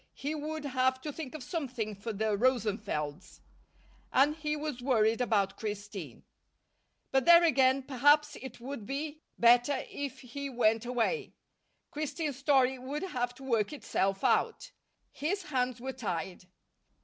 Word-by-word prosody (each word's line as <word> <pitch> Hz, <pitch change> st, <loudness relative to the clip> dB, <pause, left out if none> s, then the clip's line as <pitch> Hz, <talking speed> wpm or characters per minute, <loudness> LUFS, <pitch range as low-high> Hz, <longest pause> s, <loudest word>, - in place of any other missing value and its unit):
He 290 Hz, +3 st, -3 dB
would 310 Hz, 0 st, -4 dB
have 260 Hz, -1 st, +1 dB
to 295 Hz, +1 st, -5 dB
think 310 Hz, -2 st, -7 dB
of 300 Hz, -, -6 dB
something 250 Hz, -8 st, -3 dB
for 205 Hz, +3 st, -5 dB
the 215 Hz, 0 st, 0 dB
Rosenfelds. 205 Hz, -, -1 dB, 0.7 s
And 290 Hz, +3 st, +4 dB
he 300 Hz, -1 st, -2 dB
was 295 Hz, -4 st, -4 dB
worried 230 Hz, -3 st, +2 dB
about 200 Hz, -5 st, +1 dB
Christine. 205 Hz, -, -6 dB, 0.9 s
But 265 Hz, -1 st, +2 dB
there 340 Hz, 0 st, +8 dB
again, 270 Hz, -4 st, +4 dB
perhaps 290 Hz, +3 st, +3 dB
it 265 Hz, -, -8 dB
would 245 Hz, -4 st, -7 dB
be 295 Hz, +2 st, -4 dB, 0.2 s
better 245 Hz, +3 st, +4 dB
if 280 Hz, -2 st, -5 dB
he 275 Hz, +3 st, -6 dB
went 225 Hz, -2 st, +2 dB
away. 250 Hz, -, -1 dB, 0.6 s
Christine's 300 Hz, -2 st, -3 dB
story 265 Hz, -2 st, +3 dB
would 280 Hz, +6 st, -4 dB
have 245 Hz, -9 st, -2 dB
to 270 Hz, -, -13 dB
work 230 Hz, -4 st, +1 dB
itself 195 Hz, -8 st, -1 dB
out. -, -, +1 dB, 0.4 s
His 365 Hz, +7 st, -2 dB
hands 255 Hz, -6 st, -1 dB
were 265 Hz, +2 st, -4 dB
tied. 185 Hz, -7 st, -4 dB
260 Hz, 140 wpm, -31 LUFS, 225-290 Hz, 0.9 s, there